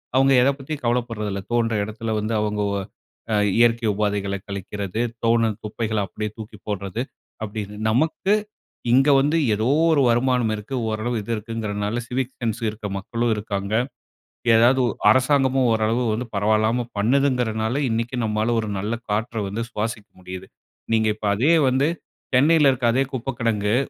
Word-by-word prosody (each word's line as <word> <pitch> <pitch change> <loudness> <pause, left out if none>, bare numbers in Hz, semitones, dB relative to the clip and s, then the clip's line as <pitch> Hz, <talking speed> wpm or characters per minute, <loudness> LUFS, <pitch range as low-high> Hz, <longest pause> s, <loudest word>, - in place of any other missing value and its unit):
அவங்க 135 +1 +5
எத 135 - +4
பத்தியும் 140 0 -6
கவலப்படுறதில்ல, 115 -5 -1
தோன்ற 115 -1 +1
இடத்துல 110 +1 -4
வந்து 110 +2 -2
அவங்க 105 0 -1
உ - - -1 0.6
அ - - +3 0.2
இயற்கை 115 0 +3
உபாதைகள 100 -1 -1
கழிக்கிறது, 100 +1 -4 0.2
தோணும் 115 -2 +2
குப்பைகள 110 0 -3
அப்டியே 105 +4 -4
தூக்கி 105 -1 -9
போடுறது, 100 +2 -3 0.4
அப்டின்னு 105 -1 -5
நமக்கு, 160 - +1 0.6
இங்க 135 +4 +5
வந்து 150 +4 +2 0.2
ஏதோ 110 +3 0 0.2
ஒரு 150 -3 +4
வருமானம் 120 -1 +2
இருக்கு, 105 +6 -6
ஓரளவு 110 +2 -2
இது 115 - -6
இருக்குங்கிறனால 110 0 -3
சிவிக் 130 +1 -2
சென்ஸ் 115 -1 -2
இருக்க 105 -1 -6
மக்களும் 115 +3 -1
இருக்காங்க, 100 -1 -4 0.8
ஏதாவது 120 +4 +5
ஒ - - +1 0.2
அரசாங்கமும் 130 +1 +3
ஓரளவு 115 +1 0
பரவாயில்லாம 110 +4 +1
பண்ணுதுகிறதுனால, 120 -2 +1
இன்னிக்கு 115 +2 -2
நம்மால 110 +2 0
ஒரு 110 - -4
நல்ல 105 +4 -2 0.2
காற்ற 115 +3 -1
வந்து 115 +4 -3
சுவாசிக்க 110 -1 -4
முடியுது. 95 +1 -8 0.5
நீங்க 110 -1 +3
இப்ப 110 -1 -4
அதே 140 +10 +3 0.2
வந்து, 135 +4 +2 0.5
சென்னையில 150 +1 +5
இருக்க 120 -2 0
அதே 135 +2 +2
குப்ப 130 +1 -3
கிடங்கு, 105 -2 +1
115 Hz, 145 wpm, -23 LUFS, 105-125 Hz, 0.8 s, அவங்க